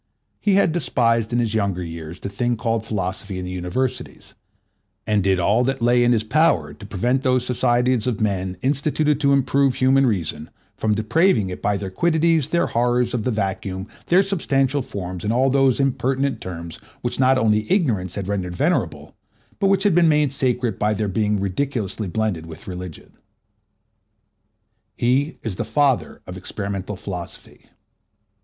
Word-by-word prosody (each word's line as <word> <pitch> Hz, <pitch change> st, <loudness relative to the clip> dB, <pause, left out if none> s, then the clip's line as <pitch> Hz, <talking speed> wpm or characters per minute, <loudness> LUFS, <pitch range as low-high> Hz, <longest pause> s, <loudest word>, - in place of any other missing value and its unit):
He 200 Hz, -2 st, +2 dB
had 195 Hz, -4 st, +4 dB
despised 115 Hz, -8 st, +1 dB
in 120 Hz, -, +1 dB
his 115 Hz, -3 st, 0 dB
younger 100 Hz, -4 st, 0 dB
years 85 Hz, 0 st, -8 dB
the -, -, -5 dB
thing 120 Hz, +4 st, -1 dB
called 115 Hz, 0 st, -1 dB
philosophy 95 Hz, -1 st, -3 dB
in 90 Hz, -, -4 dB
the 90 Hz, -, -5 dB
Universities, 90 Hz, +8 st, -4 dB, 0.7 s
and 105 Hz, -2 st, +1 dB
did 95 Hz, -1 st, +2 dB
all 105 Hz, +7 st, +3 dB
that 135 Hz, +1 st, -1 dB
lay 120 Hz, +1 st, +3 dB
in 120 Hz, -, +3 dB
his 110 Hz, -3 st, +2 dB
power 115 Hz, -, +2 dB
to 90 Hz, -, -12 dB
prevent 120 Hz, +7 st, 0 dB
those 130 Hz, -2 st, +1 dB
societies 125 Hz, -1 st, +1 dB
of 120 Hz, -5 st, -1 dB
men 95 Hz, -3 st, -1 dB
instituted 150 Hz, +2 st, +1 dB
to 140 Hz, -2 st, +2 dB
improve 140 Hz, -1 st, +2 dB
human 135 Hz, +1 st, +3 dB
reason 80 Hz, -7 st, -2 dB, 0.3 s
from 110 Hz, -1 st, 0 dB
depraving 110 Hz, -, +2 dB
it 90 Hz, -, -7 dB
by 100 Hz, -1 st, +1 dB
their 95 Hz, -1 st, -5 dB
quiddities, 160 Hz, -, +2 dB
their 170 Hz, -, +2 dB
horrors 120 Hz, +1 st, +1 dB
of 115 Hz, -4 st, -2 dB
the -, -, +1 dB
vacuum, 95 Hz, -3 st, -3 dB, 0.2 s
their 185 Hz, +3 st, +5 dB
substantial 145 Hz, -8 st, +1 dB
forms, 90 Hz, -6 st, -6 dB
and 105 Hz, -, 0 dB
all 130 Hz, +3 st, +2 dB
those 135 Hz, -1 st, +3 dB
impertinent 135 Hz, -1 st, 0 dB
terms 85 Hz, -2 st, -7 dB, 0.3 s
which 120 Hz, -, -2 dB
not 130 Hz, 0 st, +4 dB
only 110 Hz, -2 st, +1 dB
ignorance 110 Hz, -, +1 dB
had 100 Hz, -2 st, -4 dB
rendered 95 Hz, -3 st, -3 dB
venerable, -, -, -1 dB, 0.5 s
but 195 Hz, -, +2 dB
which 195 Hz, 0 st, +2 dB
had 205 Hz, -3 st, +3 dB
been 170 Hz, -1 st, +5 dB
made 150 Hz, -3 st, +2 dB
sacred 125 Hz, -5 st, -1 dB
by 105 Hz, +1 st, +1 dB
their 105 Hz, 0 st, -1 dB
being 105 Hz, +1 st, 0 dB
rediculously 105 Hz, 0 st, -2 dB
blended 105 Hz, -7 st, -2 dB
with 80 Hz, +6 st, -10 dB
religion. 90 Hz, -3 st, -8 dB, 1.9 s
He 135 Hz, +6 st, +1 dB
is 105 Hz, -5 st, -4 dB
the -, -, -1 dB
father 130 Hz, +3 st, 0 dB
of 90 Hz, -, -8 dB
experimental 100 Hz, +1 st, -5 dB
philosophy. 90 Hz, -2 st, -8 dB
115 Hz, 165 wpm, -22 LUFS, 95-135 Hz, 1.9 s, their